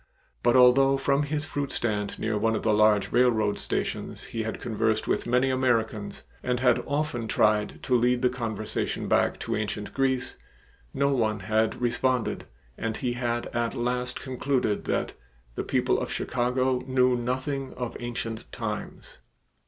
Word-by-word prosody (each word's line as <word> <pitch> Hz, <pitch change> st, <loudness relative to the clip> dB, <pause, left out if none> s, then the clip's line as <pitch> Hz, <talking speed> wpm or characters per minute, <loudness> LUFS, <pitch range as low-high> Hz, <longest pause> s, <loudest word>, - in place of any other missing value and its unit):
But 120 Hz, -, +3 dB
although 135 Hz, +2 st, +6 dB
from 140 Hz, +1 st, +2 dB
his 150 Hz, +1 st, -1 dB
fruit 145 Hz, -3 st, -3 dB
stand 105 Hz, -3 st, -2 dB
near 110 Hz, -1 st, -1 dB
one 110 Hz, +2 st, +1 dB
of -, -, -3 dB
the 110 Hz, -, +3 dB
large 105 Hz, -1 st, +4 dB
railroad 110 Hz, -5 st, +3 dB
stations -, -, -3 dB
he 115 Hz, -, -3 dB
had 110 Hz, 0 st, -4 dB
conversed 110 Hz, -1 st, 0 dB
with -, -, 0 dB
many 125 Hz, +2 st, +3 dB
Americans 115 Hz, -5 st, 0 dB, 0.2 s
and 125 Hz, -1 st, -1 dB
had 125 Hz, -1 st, +3 dB
often 145 Hz, -6 st, -1 dB
tried 105 Hz, -1 st, +1 dB
to 125 Hz, -, +2 dB
lead 125 Hz, +1 st, +2 dB
the 125 Hz, -, +5 dB
conversation 110 Hz, -4 st, -3 dB
back -, -, +2 dB
to -, -, -2 dB
ancient 105 Hz, -1 st, -3 dB
Greece, 130 Hz, -2 st, 0 dB, 0.5 s
no 140 Hz, -, +1 dB
one 110 Hz, -6 st, +1 dB
had 110 Hz, +2 st, +1 dB
responded, 125 Hz, 0 st, 0 dB, 0.3 s
and 110 Hz, -1 st, -2 dB
he 125 Hz, -2 st, -1 dB
had 120 Hz, -1 st, -1 dB
at 120 Hz, +1 st, 0 dB
last 125 Hz, +1 st, -2 dB
concluded 130 Hz, -4 st, -1 dB
that -, -, -1 dB, 0.4 s
"the -, -, -3 dB
people -, -, +1 dB
of -, -, -4 dB
Chicago 125 Hz, +1 st, 0 dB
knew 130 Hz, -1 st, +3 dB
nothing 130 Hz, +3 st, -3 dB
of 125 Hz, -2 st, -4 dB
ancient 115 Hz, -2 st, -5 dB
times." 105 Hz, -3 st, -6 dB
120 Hz, 155 wpm, -27 LUFS, 110-130 Hz, 0.5 s, although